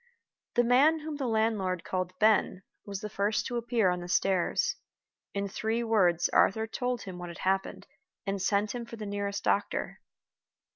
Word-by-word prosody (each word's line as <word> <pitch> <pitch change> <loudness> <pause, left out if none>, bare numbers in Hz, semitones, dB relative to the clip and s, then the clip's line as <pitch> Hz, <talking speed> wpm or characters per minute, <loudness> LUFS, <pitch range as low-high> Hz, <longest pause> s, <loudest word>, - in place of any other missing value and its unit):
The 240 - +5
man 280 +7 +4
whom 305 -1 -5
the 270 -3 -2
landlord 220 -6 0
called 185 0 -3
"Ben" 210 -3 +3 0.2
was 200 -1 -5
the 210 - -4
first 205 +1 0
to 245 - -2
appear 235 -5 +2
on 180 - -2
the 175 - -7
stairs. 185 0 +1 0.6
In 200 0 -1
three 220 +3 -1
words 180 -7 +3
Arthur 220 +3 +3
told 245 +1 -3
him 185 -2 -8
what 175 0 -6
had 170 - -9
happened, 195 +1 0 0.4
and 195 -1 -2
sent 205 +2 +1
him 245 -1 -4
for 230 0 -9
the 220 -2 -6
nearest 200 0 -3
doctor. 205 - -1
205 Hz, 175 wpm, -29 LUFS, 190-230 Hz, 0.6 s, The